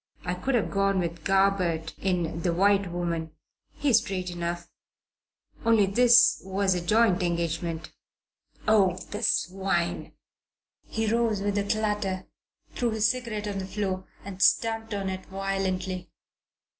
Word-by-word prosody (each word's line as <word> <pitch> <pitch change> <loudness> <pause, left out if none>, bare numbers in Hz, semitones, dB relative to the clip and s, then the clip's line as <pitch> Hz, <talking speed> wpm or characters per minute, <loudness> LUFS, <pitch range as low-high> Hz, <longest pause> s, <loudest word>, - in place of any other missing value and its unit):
I 180 - -1
could 245 +9 -1
have 225 - 0
gone 195 0 +1
with 170 -2 -3
Garbutt 185 -4 +1
in 175 -3 -1
The 175 - +1
White 195 0 +3
Woman 170 -2 -3 0.4
he's 265 -6 +3
straight 185 -5 -4
enough 175 0 -4 1.0
only 225 -3 +4
this 235 +4 +5
was 190 0 +1
a 180 - -2
joint 210 +1 +3
engagement. 170 -1 -2 0.7
Oh, 195 -4 +4
the 210 - -4
swine!" 190 -4 0 0.7
He 225 0 -2
rose 220 -2 +1
with 205 0 0
a - - 0
clatter, 205 -3 -1 0.5
threw 240 - -1
his 220 -1 +2
cigarette 230 -5 -5
on 200 -1 -3
the 190 - -5
floor 190 -2 -3 0.2
and 195 -1 -8
stamped 225 +1 +2
on 195 -1 -3
it 190 0 -5
violently. 190 -1 -3
195 Hz, 135 wpm, -27 LUFS, 180-210 Hz, 1.0 s, this